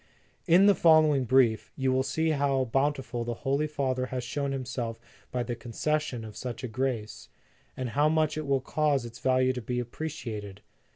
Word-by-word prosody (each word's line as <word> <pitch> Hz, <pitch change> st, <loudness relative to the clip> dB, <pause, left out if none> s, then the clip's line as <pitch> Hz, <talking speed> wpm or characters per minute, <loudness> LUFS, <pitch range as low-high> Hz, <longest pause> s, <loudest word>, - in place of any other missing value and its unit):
"In 180 Hz, +3 st, +6 dB
the 205 Hz, -, +7 dB
following 155 Hz, -6 st, +5 dB
Brief, 125 Hz, -3 st, +3 dB
you 130 Hz, -1 st, 0 dB
will 130 Hz, -, +2 dB
see 160 Hz, +4 st, 0 dB
how 140 Hz, -3 st, +1 dB
bountiful 135 Hz, -1 st, -1 dB
the 120 Hz, 0 st, -3 dB
Holy 140 Hz, +3 st, +1 dB
Father 130 Hz, -3 st, -1 dB
has 130 Hz, -1 st, -4 dB
shown 140 Hz, +3 st, -2 dB
himself 125 Hz, -4 st, -4 dB, 0.3 s
by 125 Hz, -1 st, -1 dB
the 120 Hz, 0 st, -4 dB
concession 125 Hz, +1 st, -2 dB
of 105 Hz, -1 st, -10 dB
such 125 Hz, -2 st, -6 dB
a -, -, -2 dB
grace, 115 Hz, -2 st, -3 dB, 0.5 s
and 130 Hz, -1 st, -3 dB
how 145 Hz, +5 st, +2 dB
much 155 Hz, -1 st, +1 dB
it 155 Hz, -2 st, -4 dB
will 135 Hz, -1 st, +2 dB
cause 145 Hz, -1 st, 0 dB
its 120 Hz, 0 st, -9 dB
value 130 Hz, 0 st, +2 dB
to 125 Hz, -, -5 dB
be 125 Hz, +2 st, -2 dB
appreciated. 115 Hz, -7 st, -6 dB
130 Hz, 180 wpm, -28 LUFS, 120-145 Hz, 0.5 s, the